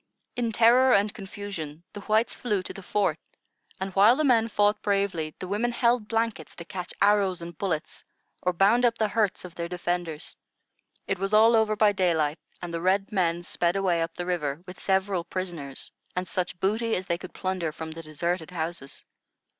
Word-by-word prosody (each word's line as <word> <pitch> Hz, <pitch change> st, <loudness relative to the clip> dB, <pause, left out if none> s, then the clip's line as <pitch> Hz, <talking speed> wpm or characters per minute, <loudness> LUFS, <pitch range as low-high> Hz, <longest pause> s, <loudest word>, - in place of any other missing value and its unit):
In 235 Hz, -2 st, 0 dB
terror 245 Hz, +3 st, +6 dB
and 205 Hz, +1 st, +2 dB
confusion 195 Hz, -7 st, -7 dB
the 205 Hz, -, -7 dB
whites 220 Hz, +3 st, +2 dB
flew 210 Hz, -6 st, -1 dB
to -, -, -6 dB
the 195 Hz, -, -9 dB
fort; 205 Hz, +2 st, 0 dB, 0.6 s
and, 190 Hz, 0 st, -4 dB
while 205 Hz, +6 st, +6 dB
the 310 Hz, -, 0 dB
men 235 Hz, -5 st, +4 dB
fought 210 Hz, -1 st, +2 dB
bravely, 195 Hz, -6 st, 0 dB
the 185 Hz, -, -6 dB
women 215 Hz, +5 st, 0 dB
held 235 Hz, -2 st, +2 dB
blankets 225 Hz, -8 st, -2 dB
to 170 Hz, -, -8 dB
catch 180 Hz, 0 st, -6 dB
arrows 200 Hz, -3 st, +3 dB
and 170 Hz, 0 st, -8 dB
bullets, 170 Hz, -5 st, -3 dB, 0.4 s
or 180 Hz, -, +1 dB
bound 200 Hz, +7 st, +4 dB
up 235 Hz, -1 st, +3 dB
the 215 Hz, -1 st, +1 dB
hurts 205 Hz, -4 st, 0 dB
of 180 Hz, -, -10 dB
their 170 Hz, 0 st, -4 dB
defenders. 175 Hz, -3 st, -3 dB, 0.7 s
It -, -, -2 dB
was 195 Hz, +2 st, +1 dB
all 225 Hz, +2 st, +7 dB
over 220 Hz, -1 st, +3 dB
by 210 Hz, 0 st, +4 dB
daylight, 165 Hz, -5 st, +1 dB, 0.2 s
and 175 Hz, -1 st, -5 dB
the 165 Hz, -, -2 dB
red 195 Hz, +4 st, +1 dB
men 175 Hz, -4 st, +1 dB
sped 175 Hz, 0 st, 0 dB
away 185 Hz, -4 st, +1 dB
up 165 Hz, 0 st, -3 dB
the 175 Hz, -, -4 dB
river, 165 Hz, -3 st, -2 dB
with 180 Hz, -, -10 dB
several 190 Hz, -2 st, +1 dB
prisoners, 170 Hz, -8 st, -5 dB, 0.2 s
and 180 Hz, 0 st, -2 dB
such 180 Hz, 0 st, -3 dB
booty 220 Hz, +4 st, +1 dB
as 185 Hz, -, -3 dB
they 170 Hz, -1 st, -1 dB
could 185 Hz, -, -10 dB
plunder 185 Hz, -4 st, -2 dB
from 160 Hz, 0 st, -7 dB
the 165 Hz, +1 st, -7 dB
deserted 165 Hz, +2 st, -3 dB
houses. 165 Hz, -5 st, -5 dB
190 Hz, 190 wpm, -27 LUFS, 170-210 Hz, 0.7 s, all